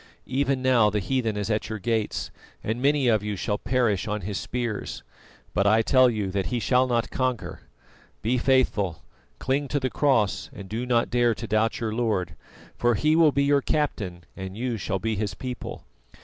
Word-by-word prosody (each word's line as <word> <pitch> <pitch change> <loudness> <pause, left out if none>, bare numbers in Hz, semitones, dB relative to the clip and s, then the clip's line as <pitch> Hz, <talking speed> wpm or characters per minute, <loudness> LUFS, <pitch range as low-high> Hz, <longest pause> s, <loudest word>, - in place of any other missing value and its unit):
Even 135 0 0
now 120 -5 +5
the 105 - -1
heathen 110 +1 -1
is 105 +2 -2
at 105 0 -1
your 110 - -3
gates, 110 +1 -2 0.3
and 115 +3 -2
many 140 -1 +3
of 110 -3 +3
you 105 0 -3
shall 105 +2 -2
perish 120 -7 +1
on 105 0 -2
his 100 +2 -3
spears, 120 -4 -4 0.5
but 100 +2 +2
I 110 +2 +4
tell 130 +1 +5
you 105 -5 -2
that 95 0 -1
he 125 - -1
shall 125 +4 +3
not 120 -1 0
conquer. 130 -3 -2 0.6
Be 125 +3 +1
faithful, 120 - +1 0.3
cling 140 +2 -1
to 145 - 0
the 130 -1 -2
Cross, 110 -10 +1
and 100 - -9
do 115 +5 -4
not 120 -2 +2
dare 120 -1 +3
to 115 - -6
doubt 110 +1 +1
your 110 -2 -2
Lord, 110 -6 -1 0.4
for 120 -1 +2
He 155 +8 +2
will 160 -2 +6
be 140 +1 +1
your 140 0 +3
Captain 105 - -2
and 95 +1 -7
you 120 0 -1
shall 95 -2 -2
be 110 +3 -2
His 100 -2 -2
people. 125 +4 -6
115 Hz, 190 wpm, -25 LUFS, 105-130 Hz, 0.6 s, will